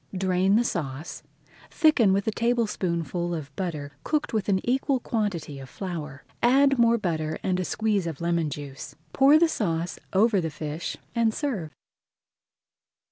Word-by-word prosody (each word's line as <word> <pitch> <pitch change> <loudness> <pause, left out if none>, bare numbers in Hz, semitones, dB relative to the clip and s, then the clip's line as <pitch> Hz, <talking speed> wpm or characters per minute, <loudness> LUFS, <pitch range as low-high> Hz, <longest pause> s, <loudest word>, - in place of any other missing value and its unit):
Drain 185 +1 +2
the 235 - +4
sauce, 150 - -4 0.5
thicken 295 - +4
with 195 +1 +1
a - - +3
tablespoonful 180 - -1
of 145 -3 -7
butter 155 -6 -4
cooked 305 -5 -1
with 215 -2 -1
an 190 -1 +3
equal 265 +1 +1
quantity 195 - -3
of 135 -1 -10
flour, 155 -7 -6 0.2
add 275 +2 +4
more 235 0 +5
butter 160 -6 -2
and 185 -1 0
a - - 0
squeeze 210 -2 0
of 160 -4 -5
lemon 170 -2 0
juice. 140 -1 -8 0.2
Pour 275 +3 +6
the 335 +1 +5
sauce 170 - -2
over 205 0 +3
the 165 - -2
fish 155 +2 -5 0.2
and 230 -2 +1
serve. 230 - -2
185 Hz, 150 wpm, -26 LUFS, 160-230 Hz, 0.5 s, Pour